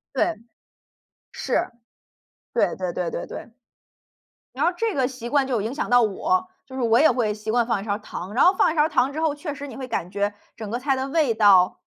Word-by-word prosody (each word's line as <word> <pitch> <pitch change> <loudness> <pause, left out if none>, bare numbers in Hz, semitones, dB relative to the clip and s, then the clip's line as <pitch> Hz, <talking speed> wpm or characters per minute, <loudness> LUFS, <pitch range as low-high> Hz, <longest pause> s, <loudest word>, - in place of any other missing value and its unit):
对， 340 - +1 1.0
是， - - -1 0.8
对 - - +1
对 185 -2 -3
对 180 -2 -2
对 - - -5
对。 - - -8 1.0
然 - - 0
后 350 - +2
这 450 +1 -1
个 260 -2 +1
习 255 -2 -7
惯 275 +1 +2
就 250 -5 0
影 225 +6 -3
响 300 - -3
到 245 0 +5
我， 345 - 0 0.2
就 260 - -12
是 260 - -2
我 230 0 +4
也 315 - +6
会 235 -4 0
习 215 +1 -5
惯 235 0 +2
放 230 -4 0
1 - - -8
勺 205 - -2
儿 205 - -1
糖。 195 -2 -8
然 255 - +4
后 365 - +7
放 325 - +3
1 - - -8
勺 300 - +5
儿 305 - +2
糖 275 -3 +1
之 310 - -4
后， 320 -2 +1
确 295 0 -6
实 285 0 -7
你 275 - -9
会 265 -1 -6
感 180 -7 -3
觉 205 +1 -1 0.2
整 220 -2 -7
个 235 - -2
菜 270 +1 0
的 265 +1 -3
味 285 -5 +1
道 195 -5 +5
250 Hz, 245 characters per minute, -23 LUFS, 215-290 Hz, 1.0 s, 后